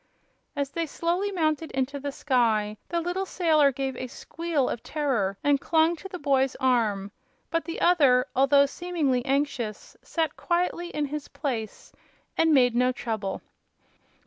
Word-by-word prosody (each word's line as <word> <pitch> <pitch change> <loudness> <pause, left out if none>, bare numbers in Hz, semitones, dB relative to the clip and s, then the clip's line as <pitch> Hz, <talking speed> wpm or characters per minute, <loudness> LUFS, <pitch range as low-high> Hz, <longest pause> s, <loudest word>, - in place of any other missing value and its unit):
As 280 -1 -2
they 335 +2 -2
slowly 350 +7 -1
mounted 315 -3 0
into 270 +2 -1
the 285 +1 -4
sky 225 -7 +1
the 340 - 0
little 360 +3 -2
sailor 310 -7 +3
gave 265 0 -3
a 255 - -5
squeal 320 +2 -2
of 230 - -3
terror 240 -11 -1
and 285 -1 +3
clung 325 +1 +3
to 385 - -9
the 365 - -6
boy's 270 -4 +1
arm; 215 -6 +1 0.4
but 330 -1 0
the 335 - -5
other, 275 -8 +4
although 280 +1 +5
seemingly 290 -5 -1
anxious, 270 -6 -2
sat 320 -3 -2
quietly 345 0 -1
in 300 -3 -2
his 295 +1 -5
place 260 -7 -5 0.4
and 325 0 +3
made 250 -5 +5
no 250 +1 +3
trouble. 220 -5 -4
280 Hz, 150 wpm, -26 LUFS, 250-330 Hz, 0.4 s, although